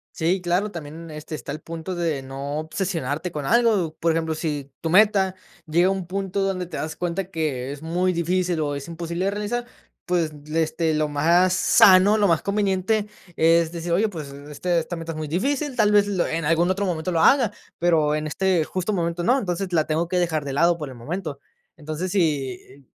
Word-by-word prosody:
Sí, 175 +3 +1
claro, 180 +4 0
también, 165 -2 -8
este, 150 +1 -8
está 150 - -5
el 150 - -5
punto 165 +3 -6
de 165 -5 -1
no 140 +3 -5
obsesionarte 160 -1 -3
con 150 -4 -4
algo. 215 -9 +2
Por 165 0 +2
ejemplo, 160 -1 -1
si 145 -4 -4
tu 165 - -3
meta 195 -1 +4 0.3
llega 170 +3 +3
a - - +3
un 190 -2 -2
punto 195 +2 -2
donde 185 -2 -2
te - - -6
das 155 - -4
cuenta 180 +2 -3
que 140 -6 -2
es 145 - -8
muy 180 +3 0
difícil 175 0 0
o 145 -2 -1
es 140 +3 -6
imposible 170 +2 -4
de 195 - +1
realizar, 210 +4 -3 0.4
pues, 175 -3 0 0.2
le 160 +1 0
este, 160 0 0
lo 155 0 +1
más 170 +5 +3
sano, 195 +3 +6
lo 205 - +4
más 165 -3 +2
conveniente 200 +1 0 0.3
es 165 0 +3
decir: 170 0 -5
"Oye, 200 +6 +3
pues, 155 -8 -7
este, 150 +5 -3
esta 165 +1 -2
meta 165 0 -5
es - - -8
muy 155 -1 -4
difícil, 265 - -1
tal 215 -4 +3
vez, 205 -1 +5
lo 195 -4 0
en 165 -1 -2
algún 165 +3 +2
otro 195 +2 0
momento 175 0 -2
lo 165 - +1
haga, 250 -2 +5 0.3
pero 160 -3 +3
en 155 0 -2
este 180 +2 +1
justo 185 +5 -2
momento 170 -1 -1
no, 255 +8 +3
entonces, 185 -3 -3
la 155 -2 +2
tengo 160 +2 0
que 180 +1 0
dejar 160 -4 0
de 140 - -4
lado 170 +4 +3
por 150 -4 -6
el 130 - -10
momento". 150 +4 -5 0.4
Entonces 155 +3 -4
si 140 -6 -2
170 Hz, 210 wpm, -23 LUFS, 155-185 Hz, 0.4 s, sano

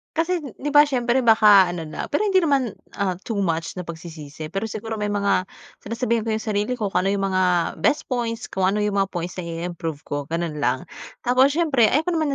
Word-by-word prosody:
Kasi, 335 +1 0
'di 285 +1 -6
ba 290 - +9
siyempre 255 -3 +1
baka 210 -5 +6
ano 165 -2 -5
na, 155 - -6
pero 420 +9 +1
hindi 380 -3 +3
naman 275 -8 +1 0.2
ah, 195 -3 0
too 225 -3 -3
much 165 -2 -1
na 180 - -5
pagsisisi. 160 -2 -8
Pero 195 +4 -2
siguro 220 +1 -5
may 210 - -1
mga 200 -2 +1 0.3
sinasabihan 230 0 -2
ko 220 - 0
'yong 220 - -3
sarili 210 +3 0
ko 210 -5 -3
kung 180 +1 +1
ano 200 - +2
'yong 195 - -1
mga 185 0 +2 0.4
best 295 - 0
points, 235 -2 -2
kung 190 -1 0
ano 205 +2 +1
'yong 205 -1 0
mga 195 - +3
points 175 +1 -5
na 175 - -4
i-improve 165 -2 -5
ko, 145 - -4
gano'n 165 -1 -3
lang. 130 -2 0 0.4
Tapos 260 +3 +3
siyempre, 300 -9 +3
ayaw 300 +7 +2
ko 355 - -2
naman 315 -5 0
210 Hz, 220 wpm, -23 LUFS, 180-255 Hz, 0.4 s, ba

